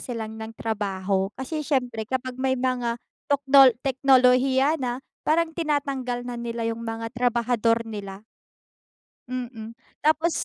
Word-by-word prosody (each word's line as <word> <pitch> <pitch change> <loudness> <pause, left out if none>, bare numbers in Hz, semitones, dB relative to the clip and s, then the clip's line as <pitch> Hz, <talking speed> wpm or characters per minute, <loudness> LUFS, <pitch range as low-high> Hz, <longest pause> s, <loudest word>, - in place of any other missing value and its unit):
silang 220 -2 -6
ng 220 +1 -8
trabaho. 195 -3 -1
Kasi 300 +4 -4
siyempre 250 -7 -1
kapag 255 0 -3
may 260 0 +1
mga 245 -2 -1 0.3
tokno 275 -1 +6 0.2
teknolohiya 265 +2 +4
na 250 +1 -3 0.2
parang 325 +1 +2
tinatanggal 275 -6 -2
na 245 -1 -5
nila 235 -1 -3
yung 230 0 -3
mga 225 +1 -5
trabahador 235 -1 +1
nila. 205 -2 -7 1.0
Mm, 240 -3 -6 0.3
tapos 315 +2 +1
245 Hz, 120 wpm, -25 LUFS, 225-270 Hz, 1.0 s, tokno